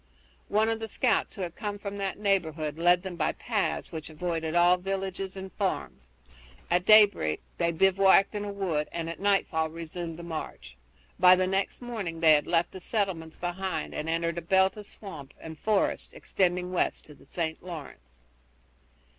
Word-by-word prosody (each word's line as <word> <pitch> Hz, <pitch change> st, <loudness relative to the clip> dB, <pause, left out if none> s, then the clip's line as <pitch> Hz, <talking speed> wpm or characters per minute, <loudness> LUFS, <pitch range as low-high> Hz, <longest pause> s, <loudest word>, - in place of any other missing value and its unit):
One 215 Hz, +2 st, +2 dB
of 225 Hz, 0 st, -1 dB
the 225 Hz, -, -4 dB
scouts -, -, 0 dB
who 190 Hz, -, -4 dB
had 175 Hz, -1 st, -5 dB
come 205 Hz, -2 st, -4 dB
from 200 Hz, 0 st, -6 dB
that 195 Hz, -1 st, -2 dB
neighborhood 160 Hz, -7 st, -1 dB
led 175 Hz, +1 st, +4 dB
them 190 Hz, -2 st, -5 dB
by -, -, 0 dB
paths 215 Hz, -5 st, -2 dB
which 160 Hz, -2 st, -6 dB
avoided 160 Hz, 0 st, -3 dB
all 175 Hz, +1 st, +5 dB
villages 195 Hz, 0 st, -4 dB
and 190 Hz, 0 st, -7 dB
farms. 65 Hz, -, -3 dB, 0.6 s
At 175 Hz, +1 st, +2 dB
daybreak 205 Hz, -, +5 dB, 0.2 s
they 170 Hz, 0 st, +2 dB
bivouacked 195 Hz, +3 st, +4 dB
in 205 Hz, -1 st, -3 dB
a 205 Hz, -, -4 dB
wood 175 Hz, -7 st, -2 dB
and 165 Hz, -1 st, -3 dB
at 170 Hz, -, -9 dB
nightfall 195 Hz, -5 st, +1 dB
resumed 165 Hz, 0 st, -6 dB
the 170 Hz, -, -8 dB
march. 155 Hz, -, -7 dB, 0.4 s
By 180 Hz, 0 st, +8 dB
the 185 Hz, 0 st, +1 dB
next 195 Hz, +5 st, -1 dB
morning 205 Hz, -9 st, -4 dB
they 160 Hz, -1 st, +7 dB
had 150 Hz, -, +2 dB
left 170 Hz, 0 st, +1 dB
the 190 Hz, -, -9 dB
settlements 180 Hz, -7 st, -2 dB
behind, 175 Hz, -2 st, -3 dB
and 155 Hz, -, -4 dB
entered 170 Hz, 0 st, 0 dB
a -, -, -8 dB
belt 190 Hz, +3 st, +3 dB
of 210 Hz, -1 st, -10 dB
swamp 155 Hz, -9 st, -10 dB
and 160 Hz, -1 st, -8 dB
forest 215 Hz, -2 st, 0 dB
extending 180 Hz, -1 st, 0 dB
west 185 Hz, -, -1 dB
to 150 Hz, -, -13 dB
the -, -, -19 dB
St. 160 Hz, -2 st, -3 dB
Lawrence. 105 Hz, -, -10 dB
180 Hz, 180 wpm, -28 LUFS, 160-195 Hz, 0.6 s, By